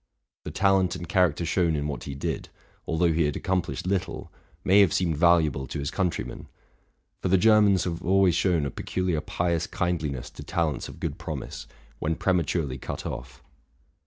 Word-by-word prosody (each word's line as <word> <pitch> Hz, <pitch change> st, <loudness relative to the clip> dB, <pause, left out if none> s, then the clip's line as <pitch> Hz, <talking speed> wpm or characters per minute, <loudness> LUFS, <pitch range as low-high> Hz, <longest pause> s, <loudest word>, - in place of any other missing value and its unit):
The -, -, -3 dB
talent 95 Hz, -2 st, +2 dB
and 85 Hz, -1 st, -6 dB
character 85 Hz, -2 st, +2 dB
shown 85 Hz, -2 st, +1 dB
in 75 Hz, 0 st, -1 dB
what 75 Hz, -, -5 dB
he 70 Hz, -, -5 dB
did, 70 Hz, -, -3 dB, 0.4 s
although 80 Hz, +1 st, +2 dB
he 80 Hz, 0 st, +2 dB
had 75 Hz, -, -1 dB
accomplished 90 Hz, -2 st, -2 dB
little, 95 Hz, -1 st, -2 dB, 0.3 s
may 100 Hz, +2 st, +5 dB
have 100 Hz, -5 st, +5 dB
seemed 85 Hz, -4 st, +1 dB
valuable 80 Hz, -5 st, +3 dB
to -, -, -5 dB
his 70 Hz, 0 st, -3 dB
country 90 Hz, -4 st, 0 dB
men; -, -, -9 dB, 0.7 s
for -, -, -1 dB
the 95 Hz, +1 st, +4 dB
Germans 105 Hz, -2 st, +5 dB
have 85 Hz, -1 st, -3 dB
always 95 Hz, 0 st, +4 dB
shown 85 Hz, -3 st, +2 dB
a 70 Hz, -, -2 dB
peculiar 90 Hz, 0 st, -2 dB
pious 85 Hz, +1 st, -1 dB
kindliness 75 Hz, -8 st, -2 dB
to -, -, -10 dB
talents 80 Hz, -4 st, -1 dB
of -, -, -11 dB
good -, -, -4 dB
promise, -, -, -6 dB, 0.3 s
when 80 Hz, +1 st, 0 dB
prematurely 80 Hz, -7 st, 0 dB
cut -, -, -6 dB
off. -, -, -7 dB
85 Hz, 175 wpm, -26 LUFS, 75-90 Hz, 0.7 s, may